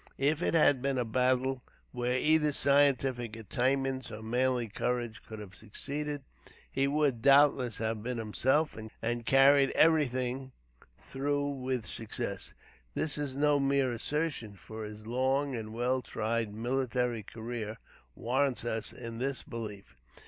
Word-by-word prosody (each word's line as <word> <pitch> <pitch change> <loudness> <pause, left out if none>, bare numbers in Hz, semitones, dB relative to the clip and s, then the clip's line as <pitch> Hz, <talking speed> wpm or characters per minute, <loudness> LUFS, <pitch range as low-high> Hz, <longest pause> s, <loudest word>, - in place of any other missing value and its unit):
If 145 +4 +1
it 170 - +1
had 145 -5 +5
been 135 0 0
a 125 - 0
battle 130 +2 +1 0.3
where 125 0 0
either 150 +1 +3
scientific 135 -5 +2
attainments 130 +4 -1
or 110 0 -7
manly 125 +1 +1
courage 120 -1 -2
could 110 - -10
have 105 -3 -9
succeeded, 145 - -5 0.5
he 135 +1 +1
would, 140 -5 +1
doubtless, 135 -3 +5
have 110 -1 -2
been 125 +2 -3
himself, 130 +8 +1 0.3
and 120 0 -1
carried 135 0 +6
everything 130 -4 +2 0.5
through 145 +1 -1
with 130 -4 -2
success. 110 0 -4 0.4
This 150 - -1
is 140 -3 -3
no 145 0 +3
mere 135 -2 +2
assertion, 130 -3 -2
for 110 +3 -8
his 105 0 -9
long 130 +4 0
and 110 -2 -5
well 125 +3 0
tried 115 -2 -2
military 120 +1 -1
career 110 0 -6 0.4
warrants 130 +1 0
us 115 -2 -2
in 115 -1 -7
this 135 0 -2
belief. 105 - -7
125 Hz, 135 wpm, -31 LUFS, 115-140 Hz, 0.5 s, carried